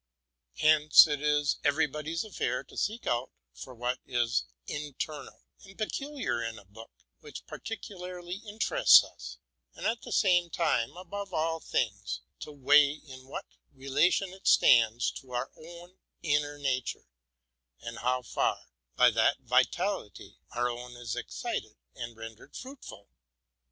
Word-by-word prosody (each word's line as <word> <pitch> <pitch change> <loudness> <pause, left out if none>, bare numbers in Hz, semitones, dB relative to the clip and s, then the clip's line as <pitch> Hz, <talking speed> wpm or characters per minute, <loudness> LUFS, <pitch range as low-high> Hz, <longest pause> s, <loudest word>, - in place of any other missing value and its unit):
Hence 155 -1 +7
it 145 -3 -2
is 150 -1 +2
everybody's 155 +2 0
duty 215 -3 -12
to - - -2
inquire 125 +1 +1
into 120 - -4
what 125 +2 -2
is 120 -1 +1 0.2
inter 150 0 -5
nal - - -17 0.2
and 195 0 -15
peculiar 275 - -2
in 115 -1 -4
a 100 - -14
book 110 +4 -13 0.3
which - - -10
particularly 180 -4 -7
interests 215 +1 +5
us, - - -10 0.4
and - - -7
at 230 +1 0
the - - -9
same 175 -4 +3
time, 165 -5 0
above 190 +1 -6
all 165 +1 0
things, 105 - -2 0.2
to - - -8
weigh 145 +1 +5
in 130 -4 -13
what 135 - -6 0.3
relation 145 +8 +1
it 190 - -9
stands 115 -1 +5
to 130 -2 -11
our 120 - -2
own 175 +3 -13 0.2
inner 145 -2 0
nature, 130 -3 -2 0.7
and 115 -1 -7
how 125 +1 0
far, - - -1 0.3
by 125 -1 +6
that 115 +4 +3
vitality, 130 - 0 0.2
our 120 0 +1
own 120 0 -6
is 120 -2 -4
excited - - -4 0.2
and 120 -1 -7
rendered 115 0 -11
fruitful. 260 - -10
145 Hz, 135 wpm, -29 LUFS, 120-175 Hz, 0.7 s, Hence